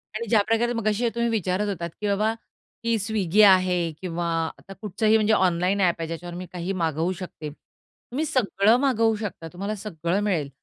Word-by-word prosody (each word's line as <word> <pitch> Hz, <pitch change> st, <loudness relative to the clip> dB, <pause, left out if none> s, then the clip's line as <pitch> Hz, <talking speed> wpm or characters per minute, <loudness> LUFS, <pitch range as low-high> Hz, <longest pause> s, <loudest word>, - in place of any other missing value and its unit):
आणि 230 Hz, +1 st, -3 dB
ज्याप्रकारे 225 Hz, +2 st, +2 dB
मघाशी 230 Hz, +1 st, 0 dB
तुम्ही 235 Hz, 0 st, +1 dB
विचारत 205 Hz, -2 st, 0 dB
होतात, 170 Hz, -4 st, -3 dB
की 210 Hz, -, -1 dB
बाबा 210 Hz, +2 st, +1 dB, 0.5 s
की 230 Hz, 0 st, +1 dB
Swiggy 210 Hz, -1 st, +2 dB
आहे 185 Hz, -1 st, +4 dB, 0.2 s
किंवा 175 Hz, -1 st, -3 dB, 0.3 s
आता 195 Hz, -, -12 dB
कुठचंही 215 Hz, +1 st, +2 dB
म्हणजे 215 Hz, 0 st, +2 dB
ऑनलाईन 185 Hz, 0 st, +2 dB
ॲप 175 Hz, -2 st, +3 dB
आहे, 165 Hz, -, -3 dB
ज्याच्यावर 170 Hz, +1 st, -6 dB
मी 180 Hz, +1 st, -6 dB
काहीही 180 Hz, +2 st, -3 dB
मागवू 165 Hz, +2 st, 0 dB
शकते. 170 Hz, -4 st, -7 dB
तुम्ही 255 Hz, -, -8 dB
सगळं 230 Hz, -6 st, +3 dB
मागवू 230 Hz, -5 st, +2 dB
शकता, 205 Hz, -6 st, -6 dB
तुम्हाला 200 Hz, +4 st, -3 dB
सगळं 185 Hz, -3 st, -2 dB
मिळेल, 170 Hz, -9 st, 0 dB
200 Hz, 170 wpm, -25 LUFS, 175-220 Hz, 0.5 s, आहे